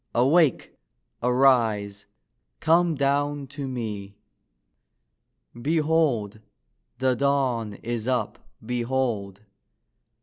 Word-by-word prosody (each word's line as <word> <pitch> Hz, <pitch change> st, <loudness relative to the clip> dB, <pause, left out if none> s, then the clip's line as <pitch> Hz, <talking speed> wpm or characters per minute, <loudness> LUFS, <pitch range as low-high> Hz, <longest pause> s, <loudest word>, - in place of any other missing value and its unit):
Awake! 140 Hz, +4 st, +3 dB, 0.5 s
arise! 115 Hz, -5 st, +2 dB, 0.5 s
come 170 Hz, 0 st, +3 dB
down 145 Hz, +1 st, 0 dB
to 140 Hz, +1 st, -7 dB
me! 105 Hz, -6 st, -5 dB, 1.5 s
Behold! 150 Hz, -8 st, +1 dB, 0.6 s
the 130 Hz, 0 st, +1 dB
Dawn 130 Hz, -5 st, 0 dB
is 120 Hz, -1 st, -3 dB
up: 125 Hz, -1 st, -1 dB, 0.3 s
behold! 120 Hz, -5 st, -2 dB
125 Hz, 70 wpm, -25 LUFS, 110-140 Hz, 1.5 s, Awake